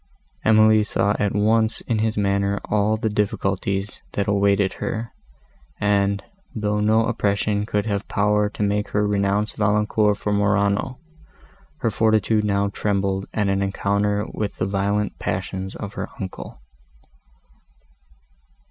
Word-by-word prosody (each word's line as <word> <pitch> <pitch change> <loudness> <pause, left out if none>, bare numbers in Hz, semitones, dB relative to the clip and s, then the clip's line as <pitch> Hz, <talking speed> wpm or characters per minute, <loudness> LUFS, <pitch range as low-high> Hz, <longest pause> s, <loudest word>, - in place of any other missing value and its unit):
Emily 110 0 +5
saw 100 0 +1
at 105 -2 0
once 110 +2 +2
in 115 -3 -1
his 110 0 0
manner 100 0 +1
all 105 +1 +1
the 110 - -1
difficulties, 100 -1 -1
that 100 - -1
awaited 100 -1 +2
her, 115 +1 -3 0.7
and, 100 -1 +1 0.3
though 105 -1 0
no 110 +2 +3
oppression 105 -2 0
could 105 -1 0
have 100 -1 -2
power 105 0 +1
to 105 - -4
make 105 0 0
her 105 - +3
renounce 100 +1 +1
Valancourt 105 0 +2
for 105 - -2
Morano, 100 +4 +1 0.8
her 115 - +1
fortitude 110 0 +2
now 100 -1 +1
trembled 100 -1 -1
at 105 -2 0
an 95 0 +1
encounter 100 +1 0
with 105 -2 -3
the - - -1
violent 100 +1 -1
passions 95 0 -3
of 100 -1 -6
her - - -5
uncle. 95 -2 -7
105 Hz, 130 wpm, -22 LUFS, 100-105 Hz, 0.8 s, Emily